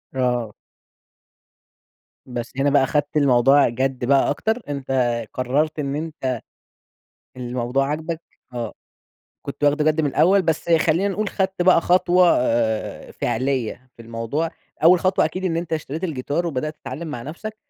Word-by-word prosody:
آه. 125 -4 0 1.7
بس 120 -2 -6
هنا 140 +1 +2
بقى 140 -1 +4
أخدت 145 +3 0
الموضوع 135 0 +5
جَدّ 130 +1 -2
بقى 135 +1 +3
أكتر، 220 - -1
أنت 140 -2 -4 0.4
قررت 145 +5 0
إن 140 -1 -2
أنت 150 -6 -3 1.0
الموضوع 125 +2 -1
عاجبك، 160 +3 -3 0.3
آه 120 -3 -4 0.7
كنت 140 +1 -4
واخدُه 150 +1 +3
جَدّ 155 0 +2
من 150 - +1
الأول 185 +8 +4
بس 160 0 -1
خلّينا 165 +4 +3
نقول 205 +1 -2
خدت 190 -2 -1
بقى 180 -1 +5
خطوة 180 0 +4
آآ، 115 -3 -1
فعلية 130 0 -2
في 115 - -12
الموضوع، 115 +8 -3 0.3
أول 175 +1 +7
خطوة 185 0 +2
أكيد 185 +1 -3
إن 165 -3 0
أنت 170 -1 -4
اشتريت 155 +2 -3
الجيتار 155 +1 -2
وبدأت 155 0 -3
تتعلّم 165 +2 -7
مع 125 -6 -5
نفسك، 215 - -7
145 Hz, 140 wpm, -22 LUFS, 130-165 Hz, 1.7 s, أول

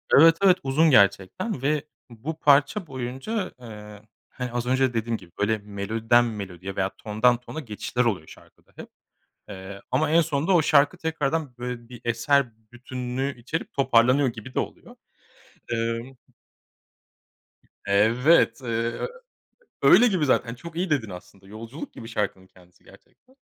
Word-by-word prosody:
Evet, 165 +3 +7
evet 190 -2 +6
uzun 150 +5 +3
gerçekten 100 - +2
ve 145 +1 0 0.3
bu 135 +8 -7
parça 145 +7 +3
boyunca, 135 - -4
eee, 105 -3 -11 0.3
hani 125 -1 -6
az 120 0 -2
önce 130 0 +1
dediğim 115 0 -1
gibi 90 -4 -17
böyle 110 +2 +1
melodiden 110 +4 +1
melodiye 95 -4 -6
veya 95 0 -1
tondan 110 +3 +2
tona 125 +5 -8
geçişler 120 -1 -2
oluyor 95 -9 -1
şarkıda - - -18
hep - - -10 0.6
,eee, 100 0 -9
ama 155 0 +1
en 165 +2 +5
sonunda 160 +2 0
o 170 - +5
şarkı 145 +3 +4
tekrardan 160 -4 -2
böyle 120 -1 -6
bir 125 -1 -11
eser 120 +2 +1 0.2
bütünlüğü 125 +2 -4
içerip 160 +7 -4
toparlanıyor 130 +1 +3
gibi 120 +2 -8
de - - +2
oluyor. - - -8 0.8
Imm. 115 +3 -3 1.7
Evet, 115 +6 +3
eee, 115 -1 -2 0.9
öyle 245 - +7
gibi 185 -8 +1
zaten 120 -3 +1
çok 165 +6 -11
iyi 180 0 -1
dedin 125 -8 0
aslında 95 +2 -12
yolculuk 115 +8 -9
gibi 115 - -10
şarkının 100 -4 -3
kendisi 90 -1 -23
gerçekten. 260 +1 -22
125 Hz, 140 wpm, -25 LUFS, 110-145 Hz, 1.7 s, Evet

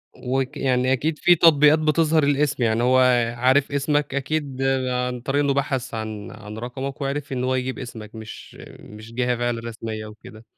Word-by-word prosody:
وك 130 +1 -2
يعني 130 -1 +1
أكيد 150 +4 -1
فيه 175 - +5
تطبيقات 155 -2 +5
بتظهِر 155 0 +2
الاسم، 140 -2 +1
يعني 115 0 +1
هو 130 +1 +4 0.4
عارف 130 +3 +3
اسمك 145 0 0
أكيد 140 -1 -2 0.3
عن 125 -1 -2
طريق 140 +3 0
إنه 140 -1 +2
بَحَث 135 -2 -2
عن 110 -2 -5
عن 105 0 -10
رقمك 130 +4 -6
وعرِف 140 +1 -3
إن 125 -1 -2
هو 130 0 +1
يجيب 130 0 -3
اسمك، 115 -3 -9
مش 110 -1 -10 0.2
مش 110 +2 -12
جهة 125 0 0
فعلًا 120 -1 -1
رسمية 110 -1 -6
وكده. 110 +1 -13
130 Hz, 170 wpm, -23 LUFS, 115-140 Hz, 0.4 s, فيه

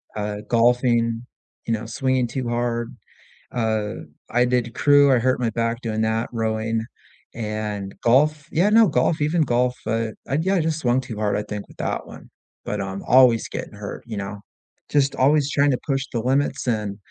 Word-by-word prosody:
uh, 105 0 -3
golfing, 120 -1 +2 0.4
you 115 - +1
know, 110 +1 -3
swinging 130 +2 0
too 125 0 -3
hard. 120 -1 -2 0.6
Uh, 110 -3 -1 0.4
I 120 +1 +3
did 120 -1 0
crew, 145 -1 +5
I 130 - +5
hurt 130 +1 +1
my 120 -2 +1
back 115 +2 -2
doing 110 -1 -2
that 110 +1 0
rowing 110 0 -1 0.5
and 105 -3 -4
golf 145 +5 +3
yeah, 185 +6 +3
no 225 0 +6
golf, 145 +2 +1
even 160 +3 +2
golf, 125 -2 +1
uh, 115 0 0 0.2
I 135 - 0
yeah 190 +3 +1
I - - +3
just 160 0 -1
swung 125 -1 +1
too 120 -4 -8
hard, 105 -1 0
I 105 - -2
think 105 -1 -6
with - - -18
that - - -3
one, - - -13 0.4
but 105 -1 -2
I'm 95 0 -5
always 125 -3 +5
getting - - -6
hurt, - - -7
you 110 -3 -6
know, 100 +1 -5 0.5
just 140 -2 +2
always 145 +2 +3
tryna 145 -2 +3
push 135 -1 0
the 115 - -1
limits 135 +1 0
and, 105 -4 -1
120 Hz, 180 wpm, -23 LUFS, 110-135 Hz, 0.6 s, no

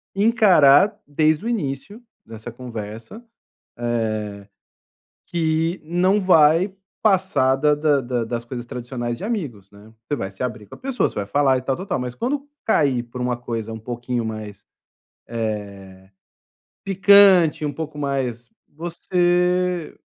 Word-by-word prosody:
encarar 200 - +5
desde 155 +5 +1
o - - -1
início 200 - -4 0.2
dessa 115 +1 -9
conversa, 115 - -8 0.5
eh 120 -1 -1 1.2
que 165 +1 0
não 180 +5 +2
vai 175 0 +4 0.3
passar 190 -10 +3
da 150 +2 +3
da 145 -2 +2
da 120 -1 -2
das 115 +1 -4
coisas 120 0 -6
tradicionais 120 -1 -5
de - - -8
amigos, 145 - -4
né, 105 +2 -16
você 145 - -2
vai 95 -7 -5
se 95 - -13
abrir 115 -4 -4
com - - -14
a - - -15
pessoa 265 -2 0
você - - -16
vai 100 - -2
falar 135 +4 +3
e - - -4
tal-tal-tal, 155 +9 -2
mas 125 -1 -5
quando 280 - -2 0.2
cair 140 - +2
por 125 +1 -8
uma 125 -1 -1
coisa 115 -2 -5
um 110 - -7
pouquinho 120 +1 -4
mais, 110 -2 -7 0.6
eh, 115 -2 -1 1.3
picante 195 -5 +5
um 145 - -1
pouco 155 -1 -6
mais 130 -5 -3 0.2
você 175 +1 0
140 Hz, 140 wpm, -22 LUFS, 120-180 Hz, 1.3 s, encarar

